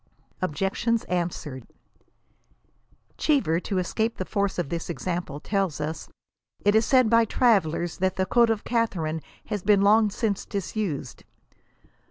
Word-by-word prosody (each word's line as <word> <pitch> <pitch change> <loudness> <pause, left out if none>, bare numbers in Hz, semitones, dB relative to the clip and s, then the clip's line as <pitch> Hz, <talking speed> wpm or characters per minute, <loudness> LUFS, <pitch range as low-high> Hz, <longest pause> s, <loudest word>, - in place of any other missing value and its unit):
OBJECTIONS 195 +7 0
ANSWERED. 165 -8 -3 1.5
Cheever, 265 - +2
to 195 +1 -3
escape 220 +5 -1
the 185 - -3
force 200 0 -1
of 175 -6 -2
this 170 +1 -4
example, 170 -3 -3
tells 195 -4 -1
us 155 +2 -4 0.3
" - - -37
it 205 - +5
is 220 +1 +3
said 255 -3 +5
by 230 +1 +5
travellers 190 -8 +1
that 185 0 +1
the 190 - 0
code 235 +4 +4
of 220 -2 0
Catharine 175 -10 -1 0.2
has 205 - -3
been 200 +1 +4
long 215 +1 +5
since 205 0 -1
disused." 195 - -4
195 Hz, 140 wpm, -25 LUFS, 170-220 Hz, 1.5 s, it